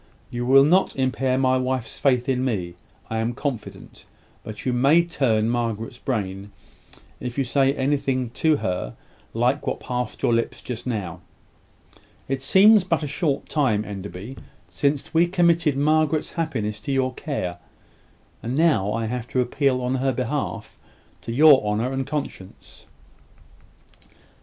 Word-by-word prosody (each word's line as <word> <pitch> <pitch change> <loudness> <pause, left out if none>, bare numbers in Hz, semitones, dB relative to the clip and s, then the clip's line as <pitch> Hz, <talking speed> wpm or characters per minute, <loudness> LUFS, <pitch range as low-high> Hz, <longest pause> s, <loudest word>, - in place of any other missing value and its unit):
You 120 0 -3
will 135 +1 +7
not 180 +6 +3
impair 130 0 0
my 130 -1 +2
wife's 130 -3 -3
faith 125 -3 +2
in 130 -1 0
me, 95 -9 -2 0.4
I 110 - -1
am 115 +2 -1
confident; 125 -7 -6 0.4
but 110 -1 -8
you 125 - +1
may 140 +7 +4
turn 115 -10 +1
Margaret's 115 -1 -2
brain, 100 -5 -3 0.7
if 125 0 -6
you 135 - +2
say 135 +1 +2
to 140 - -7
her - - -8
anything 135 -3 0 1.0
like 125 +5 +1
what - - -1
passed 125 -2 -4
your 120 - +3
lips 115 0 -1
just 125 0 -6
now. 95 -7 -4 1.1
It 135 0 -2
seems 195 +8 +6
but 165 -4 -1
a - - -2
short 145 0 -1
time, 115 -9 +1
Enderby, 100 +4 -8 0.3
since 140 0 -1
we 165 +2 +4
committed 170 -5 +2
Margaret's 155 +1 +1
happiness 115 - -3
to 110 +6 -5
your 130 -1 0
care; 90 - -4 0.8
and 120 +3 -3
now 145 - +2
I 115 0 -1
have 120 +1 -4
to 130 - -1
appeal 125 +1 +1
on 125 +1 -1
her 135 0 +2
behalf 125 -3 -4 0.4
to 115 - -6
your 140 0 +6
honour 105 +4 -1
and 135 -1 -2
conscience." 140 -10 -7
130 Hz, 145 wpm, -23 LUFS, 115-140 Hz, 1.1 s, will